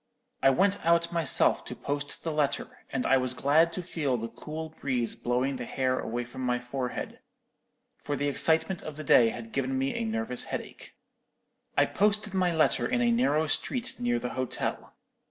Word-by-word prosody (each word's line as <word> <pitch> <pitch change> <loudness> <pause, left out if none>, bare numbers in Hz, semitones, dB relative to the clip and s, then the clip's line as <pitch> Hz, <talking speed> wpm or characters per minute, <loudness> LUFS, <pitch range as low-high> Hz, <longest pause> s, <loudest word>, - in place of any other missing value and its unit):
I 135 - +6
went 195 +9 +2
out 170 0 +3
myself 165 -4 +3
to - - -6
post 145 0 -4
the 165 - -1
letter, 150 -2 -2
and 130 -2 -2
I 135 - +5
was 130 -1 0
glad 155 +6 +3
to 180 - -3
feel 145 -7 -1
the 115 0 -4
cool 160 +4 -7
breeze 130 -6 -2
blowing 125 +3 -1
the 125 - -5
hair 130 0 0
away 120 +2 -3
from 125 +2 -9
my 125 -1 +1
forehead, 125 +1 -5 0.8
for 145 - -3
the 145 0 -1
excitement 160 +5 +2
of 155 -1 -8
the 155 - -5
day 120 -5 +6
had 115 0 -7
given 135 -1 -1
me 135 +1 0
a - - -2
nervous 110 +3 -2
headache. - - -7 0.8
"I - - +6
posted 210 0 +1
my 185 -2 +2
letter 160 -2 +2
in 250 - 0
a 240 - +3
narrow 230 - +2
street 245 - -1
near 120 0 +1
the 125 +1 -3
hotel. 130 0 -3
140 Hz, 185 wpm, -28 LUFS, 125-165 Hz, 0.8 s, I